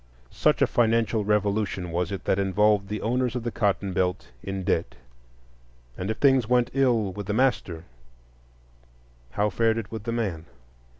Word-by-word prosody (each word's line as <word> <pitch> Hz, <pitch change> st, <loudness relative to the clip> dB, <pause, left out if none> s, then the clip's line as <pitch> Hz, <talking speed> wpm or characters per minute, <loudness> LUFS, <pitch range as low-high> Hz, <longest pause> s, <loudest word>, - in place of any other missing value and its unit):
Such -, -, +2 dB
a -, -, +6 dB
financial 115 Hz, -2 st, +1 dB
revolution 100 Hz, -3 st, 0 dB
was 90 Hz, +2 st, -1 dB
it 95 Hz, -2 st, -5 dB
that 95 Hz, -, +1 dB
involved 100 Hz, +1 st, +2 dB
the 105 Hz, +1 st, -4 dB
owners 125 Hz, +1 st, 0 dB
of 125 Hz, -, -3 dB
the 120 Hz, -, -2 dB
cotton 100 Hz, -3 st, 0 dB
belt 90 Hz, +1 st, -1 dB
in 95 Hz, -1 st, -5 dB
debt. 65 Hz, -, -1 dB, 1.0 s
And 95 Hz, +2 st, -4 dB
if 110 Hz, -, -2 dB
things 135 Hz, -5 st, +3 dB
went 125 Hz, -1 st, +2 dB
ill 120 Hz, -7 st, +2 dB
with 100 Hz, +1 st, -7 dB
the 105 Hz, -, -1 dB
master, 105 Hz, -9 st, 0 dB, 1.5 s
how 105 Hz, 0 st, +1 dB
fared 115 Hz, +2 st, +1 dB
it 115 Hz, -2 st, -5 dB
with 110 Hz, -1 st, -6 dB
the 115 Hz, -, -2 dB
man? 95 Hz, -9 st, -3 dB
105 Hz, 165 wpm, -25 LUFS, 95-115 Hz, 1.5 s, a